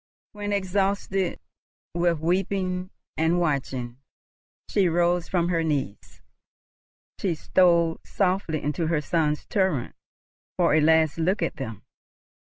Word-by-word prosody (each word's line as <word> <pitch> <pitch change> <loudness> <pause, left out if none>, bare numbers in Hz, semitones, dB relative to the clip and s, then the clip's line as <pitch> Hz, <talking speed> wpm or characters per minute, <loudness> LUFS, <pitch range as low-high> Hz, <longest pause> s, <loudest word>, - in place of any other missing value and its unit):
When, 205 -1 -5
exhausted 195 -1 0 0.5
with 170 -2 +1
weeping 185 +1 -1 0.3
and 160 +2 +2
watching, 130 -6 -2 0.7
she 190 -3 +2
rose 175 +1 +1
from 175 -2 0
her 165 -2 +1
knees, 140 -10 -3 1.0
she 180 -4 0
stole 170 0 +3
softly 185 -5 -1
into 150 +3 -1
her 160 -2 +1
sons' 150 0 0
turret 190 - 0 0.6
for - - +3
a 155 - +4
last 160 0 +3
look 185 +5 +1
at - - -2
them. 115 -6 -6
170 Hz, 115 wpm, -25 LUFS, 155-185 Hz, 1.0 s, a